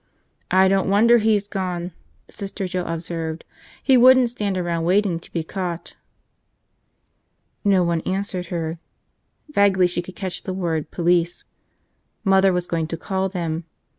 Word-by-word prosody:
"I 190 Hz, +1 st, +5 dB
don't 195 Hz, 0 st, +2 dB
wonder 230 Hz, +4 st, +5 dB
he's 210 Hz, -2 st, +2 dB
gone," 180 Hz, -3 st, -3 dB, 0.4 s
Sister 195 Hz, 0 st, -6 dB
Joe 180 Hz, -1 st, -3 dB
observed. 165 Hz, -1 st, -4 dB, 0.4 s
"He 265 Hz, -2 st, +5 dB
wouldn't 255 Hz, -1 st, +6 dB
stand 205 Hz, -5 st, -2 dB
around 170 Hz, -2 st, -1 dB
waiting 185 Hz, 0 st, +2 dB
to -, -, -17 dB
be 165 Hz, -, -2 dB
caught." 175 Hz, -1 st, -5 dB, 1.7 s
No 195 Hz, -3 st, +4 dB
one 170 Hz, -1 st, 0 dB
answered 185 Hz, -1 st, -2 dB
her. 165 Hz, -1 st, -3 dB, 0.7 s
Vaguely 200 Hz, -6 st, +4 dB
she 175 Hz, 0 st, -1 dB
could 185 Hz, +1 st, -11 dB
catch 185 Hz, -1 st, -4 dB
the 190 Hz, -, -5 dB
word 165 Hz, -5 st, -2 dB
police. 175 Hz, 0 st, +1 dB, 0.8 s
Mother 195 Hz, -1 st, +4 dB
was 180 Hz, -1 st, 0 dB
going 165 Hz, -2 st, -2 dB
to 165 Hz, -, -4 dB
call 190 Hz, +3 st, -2 dB
them. 170 Hz, -3 st, -3 dB
185 Hz, 140 wpm, -22 LUFS, 170-195 Hz, 1.7 s, wouldn't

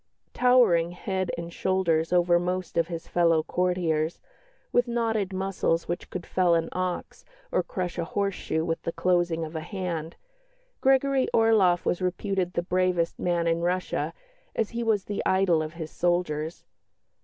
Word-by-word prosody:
Towering 235 Hz, -10 st, +4 dB
head 185 Hz, 0 st, -2 dB
and 170 Hz, 0 st, -6 dB
shoulders 170 Hz, -4 st, +1 dB
over 175 Hz, -1 st, +4 dB
most 180 Hz, 0 st, -3 dB
of 170 Hz, -1 st, +2 dB
his 170 Hz, -2 st, -6 dB
fellow 165 Hz, -2 st, +3 dB
courtiers, 175 Hz, -3 st, 0 dB, 0.5 s
with 245 Hz, 0 st, +3 dB
knotted 225 Hz, -4 st, 0 dB
muscles 190 Hz, -3 st, -1 dB
which 175 Hz, -, -4 dB
could 180 Hz, -2 st, -5 dB
fell 180 Hz, -2 st, +2 dB
an 165 Hz, 0 st, 0 dB
ox 185 Hz, -1 st, -4 dB, 0.3 s
or -, -, +2 dB
crush 180 Hz, -2 st, -4 dB
a -, -, +1 dB
horse 200 Hz, +3 st, -1 dB
shoe 160 Hz, -2 st, -2 dB
with 165 Hz, -1 st, -2 dB
the -, -, -3 dB
closing 175 Hz, -2 st, +1 dB
of 160 Hz, +1 st, -9 dB
a -, -, -1 dB
hand, 170 Hz, -3 st, -4 dB, 0.7 s
Gregory 270 Hz, 0 st, +3 dB
Orloff 210 Hz, -6 st, +4 dB
was 175 Hz, -, 0 dB
reputed 185 Hz, 0 st, -1 dB
the 170 Hz, -, -1 dB
bravest 180 Hz, -1 st, 0 dB
man 175 Hz, -1 st, 0 dB
in 165 Hz, 0 st, +1 dB
Russia, 180 Hz, +1 st, -1 dB, 0.4 s
as 220 Hz, -, -1 dB
he 235 Hz, -, -3 dB
was 220 Hz, -4 st, +1 dB
the 205 Hz, -, -3 dB
idol 190 Hz, -4 st, +3 dB
of 155 Hz, 0 st, -5 dB
his 160 Hz, -2 st, -7 dB
soldiers. 175 Hz, -2 st, -1 dB
180 Hz, 160 wpm, -27 LUFS, 170-190 Hz, 0.7 s, Towering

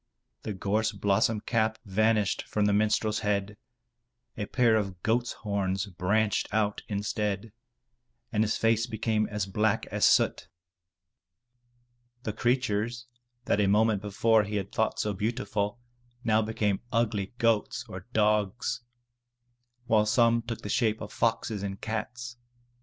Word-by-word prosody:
The 105 Hz, -, -4 dB
gorse 105 Hz, +3 st, 0 dB
blossom 100 Hz, +2 st, +1 dB
cap 110 Hz, -2 st, 0 dB
vanished 105 Hz, 0 st, +2 dB
from 105 Hz, -1 st, 0 dB
the 105 Hz, -, +3 dB
minstrel's 110 Hz, +1 st, +2 dB
head, 105 Hz, -1 st, -1 dB, 0.8 s
a 105 Hz, -2 st, -4 dB
pair 120 Hz, -3 st, +3 dB
of 95 Hz, -4 st, -2 dB
goat's 120 Hz, +2 st, +1 dB
horns 100 Hz, -2 st, -2 dB
branched 100 Hz, +3 st, 0 dB
out 105 Hz, -1 st, 0 dB
instead, 105 Hz, 0 st, -2 dB, 0.8 s
and 110 Hz, -1 st, +2 dB
his 110 Hz, -, 0 dB
face 115 Hz, +1 st, +2 dB
became 110 Hz, -2 st, 0 dB
as 105 Hz, -2 st, -2 dB
black 105 Hz, +2 st, 0 dB
as -, -, -1 dB
soot. -, -, +4 dB, 1.8 s
The 110 Hz, -, -3 dB
creatures 120 Hz, 0 st, 0 dB, 0.4 s
that 105 Hz, -, +2 dB
a 100 Hz, -, +3 dB
moment 105 Hz, 0 st, +3 dB
before 110 Hz, +2 st, +3 dB
he 105 Hz, +1 st, -4 dB
had 100 Hz, -1 st, -3 dB
thought 110 Hz, -, 0 dB
so 105 Hz, -, 0 dB
beautiful, 105 Hz, +1 st, -2 dB, 0.4 s
now 110 Hz, -1 st, +3 dB
became 105 Hz, -2 st, -1 dB
ugly 110 Hz, -3 st, 0 dB
goats 115 Hz, -3 st, +1 dB
or 95 Hz, 0 st, -9 dB
dogs, 105 Hz, 0 st, +1 dB, 1.0 s
while 110 Hz, -2 st, +3 dB
some 115 Hz, +1 st, +4 dB
took 115 Hz, 0 st, -6 dB
the -, -, -6 dB
shape 110 Hz, -1 st, +1 dB
of 105 Hz, -, -8 dB
foxes 115 Hz, -2 st, 0 dB
and 100 Hz, 0 st, -4 dB
cats. 120 Hz, +2 st, -5 dB
110 Hz, 135 wpm, -28 LUFS, 100-115 Hz, 1.8 s, soot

